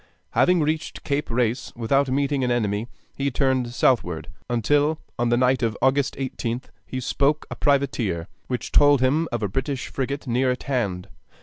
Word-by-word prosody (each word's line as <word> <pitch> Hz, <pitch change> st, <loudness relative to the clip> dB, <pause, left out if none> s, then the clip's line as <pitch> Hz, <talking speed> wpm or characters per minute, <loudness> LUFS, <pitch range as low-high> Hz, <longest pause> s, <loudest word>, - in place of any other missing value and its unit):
Having 180 Hz, -2 st, +3 dB
reached 155 Hz, +1 st, -2 dB
Cape 145 Hz, +1 st, -1 dB
Race 120 Hz, +1 st, 0 dB
without 135 Hz, +4 st, +1 dB
meeting 140 Hz, 0 st, +1 dB
an 125 Hz, -, +1 dB
enemy, 110 Hz, -2 st, 0 dB, 0.3 s
he 140 Hz, 0 st, 0 dB
turned 130 Hz, -2 st, +1 dB
southward, 100 Hz, -9 st, +1 dB, 0.2 s
until 145 Hz, +6 st, +2 dB, 0.2 s
on 120 Hz, 0 st, +2 dB
the 120 Hz, -, +3 dB
night 130 Hz, +1 st, +3 dB
of 115 Hz, -3 st, 0 dB
August 135 Hz, +1 st, +2 dB
18th 125 Hz, -2 st, -4 dB, 0.2 s
he 130 Hz, -, -4 dB
spoke 140 Hz, +4 st, +1 dB
a -, -, -3 dB
privateer, 120 Hz, -, 0 dB, 0.2 s
which 125 Hz, -1 st, -3 dB
told 145 Hz, -2 st, +5 dB
him 150 Hz, +6 st, +2 dB
of 120 Hz, -2 st, -2 dB
a -, -, +2 dB
British 130 Hz, +6 st, -3 dB
frigate 140 Hz, +2 st, -3 dB
near 125 Hz, +1 st, +1 dB
at 125 Hz, -, -2 dB
hand. 100 Hz, -10 st, -2 dB
130 Hz, 170 wpm, -24 LUFS, 120-140 Hz, 0.3 s, told